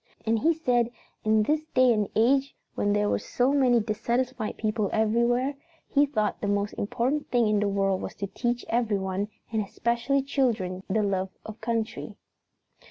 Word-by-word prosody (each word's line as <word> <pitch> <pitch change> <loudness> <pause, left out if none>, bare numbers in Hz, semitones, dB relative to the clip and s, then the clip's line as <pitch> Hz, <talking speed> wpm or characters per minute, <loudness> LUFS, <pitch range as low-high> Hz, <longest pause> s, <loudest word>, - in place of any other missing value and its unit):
And 225 0 +2
he 325 +8 +3
said 245 -7 +1 0.3
in 215 0 +3
this 300 +7 +1
day 255 -2 +6
and 210 -3 0
age 270 +5 +3 0.2
when 205 - 0
there 205 0 +2
were - - +1
so 255 +3 0
many 255 -4 +4
dissatisfied 235 +2 -2
people 215 -2 -1
everywhere, 235 +5 +2 0.3
he 285 0 +3
thought 215 -7 -1
the 205 - -1
most 205 0 0
important 255 +8 -1
thing 240 -3 +3
in 210 -1 +2
the 210 - +1
world 195 -1 +1
was - - -6
to 200 - -3
teach 240 +4 -2
everyone, 205 -4 0 0.2
and 220 -1 +1
especially 235 +6 0
children, 225 -10 0
the 210 +2 +1
love 190 -1 0 0.2
of 220 0 -9
country." 225 -1 -3
225 Hz, 165 wpm, -27 LUFS, 205-250 Hz, 0.3 s, day